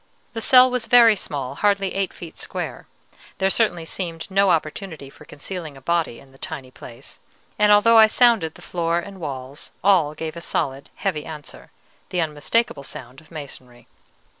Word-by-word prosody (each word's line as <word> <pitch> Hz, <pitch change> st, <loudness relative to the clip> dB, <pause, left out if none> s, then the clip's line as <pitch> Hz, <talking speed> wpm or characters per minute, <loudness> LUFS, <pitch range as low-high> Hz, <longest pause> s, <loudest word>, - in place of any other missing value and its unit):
The 225 Hz, -, -4 dB
cell 255 Hz, +2 st, +7 dB
was 250 Hz, -2 st, -2 dB
very 235 Hz, -3 st, +7 dB
small, 140 Hz, -8 st, -5 dB
hardly 200 Hz, +2 st, +1 dB
eight 195 Hz, -1 st, -1 dB
feet 165 Hz, -2 st, -11 dB
square. -, -, -5 dB, 0.5 s
There 190 Hz, 0 st, +2 dB
certainly 180 Hz, -8 st, +1 dB
seemed 165 Hz, -1 st, -4 dB
no 195 Hz, 0 st, +3 dB
opportunity 160 Hz, -3 st, -2 dB
for -, -, -16 dB
concealing 155 Hz, 0 st, -8 dB
a -, -, -11 dB
body 170 Hz, -5 st, -1 dB
in 135 Hz, -, -18 dB
the 135 Hz, -, -20 dB
tiny 130 Hz, -2 st, -7 dB
place; 120 Hz, -2 st, -12 dB, 0.4 s
and 210 Hz, 0 st, +5 dB
although 225 Hz, +2 st, +6 dB
I 220 Hz, -, +9 dB
sounded 225 Hz, -9 st, +3 dB
the -, -, -14 dB
floor 170 Hz, -1 st, -1 dB
and 195 Hz, +2 st, -6 dB
walls, 135 Hz, -2 st, -6 dB
all 175 Hz, -7 st, +3 dB
gave 160 Hz, 0 st, -5 dB
a 170 Hz, -, -7 dB
solid, 140 Hz, -5 st, -2 dB
heavy 170 Hz, -7 st, -2 dB
answer, 155 Hz, -2 st, -10 dB, 0.4 s
the 180 Hz, -, -2 dB
unmistakable 160 Hz, +5 st, 0 dB
sound 130 Hz, 0 st, -9 dB
of 160 Hz, -, -22 dB
masonry. 130 Hz, -6 st, -10 dB
170 Hz, 170 wpm, -22 LUFS, 145-200 Hz, 0.5 s, I